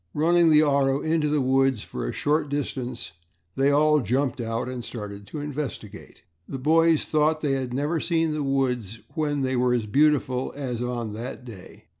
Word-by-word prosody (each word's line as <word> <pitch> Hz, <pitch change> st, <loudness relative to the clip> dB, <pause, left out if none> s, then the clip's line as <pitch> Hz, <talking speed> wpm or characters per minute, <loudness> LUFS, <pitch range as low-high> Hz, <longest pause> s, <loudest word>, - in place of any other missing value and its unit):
Running 170 Hz, +2 st, +4 dB
the 155 Hz, 0 st, +6 dB
auto 140 Hz, -2 st, +2 dB
into 155 Hz, -1 st, 0 dB
the 150 Hz, -1 st, +1 dB
woods 135 Hz, -2 st, +2 dB
for -, -, -5 dB
a -, -, -2 dB
short 150 Hz, 0 st, 0 dB
distance, 125 Hz, -7 st, -4 dB, 0.4 s
they 135 Hz, +1 st, +3 dB
all 150 Hz, +1 st, +4 dB
jumped 130 Hz, +2 st, -1 dB
out 115 Hz, +1 st, -3 dB
and 125 Hz, -1 st, -5 dB
started 100 Hz, -4 st, -7 dB
to 155 Hz, -, -6 dB
investigate. 140 Hz, -8 st, -7 dB, 0.3 s
The 135 Hz, -, -4 dB
boys 160 Hz, +3 st, +3 dB
thought 155 Hz, 0 st, +1 dB
they 145 Hz, -, 0 dB
had 130 Hz, -2 st, -2 dB
never 145 Hz, +6 st, -1 dB
seen 165 Hz, -1 st, 0 dB
the 150 Hz, -, -2 dB
woods 125 Hz, -6 st, -1 dB
when 145 Hz, -3 st, -1 dB
they 130 Hz, 0 st, 0 dB
were 125 Hz, 0 st, +2 dB
as 115 Hz, -3 st, -1 dB
beautiful 135 Hz, +1 st, +1 dB
as 125 Hz, -4 st, -4 dB
on 120 Hz, -3 st, -3 dB
that 125 Hz, +3 st, -7 dB
day. 105 Hz, -7 st, -12 dB
135 Hz, 180 wpm, -25 LUFS, 125-150 Hz, 0.4 s, the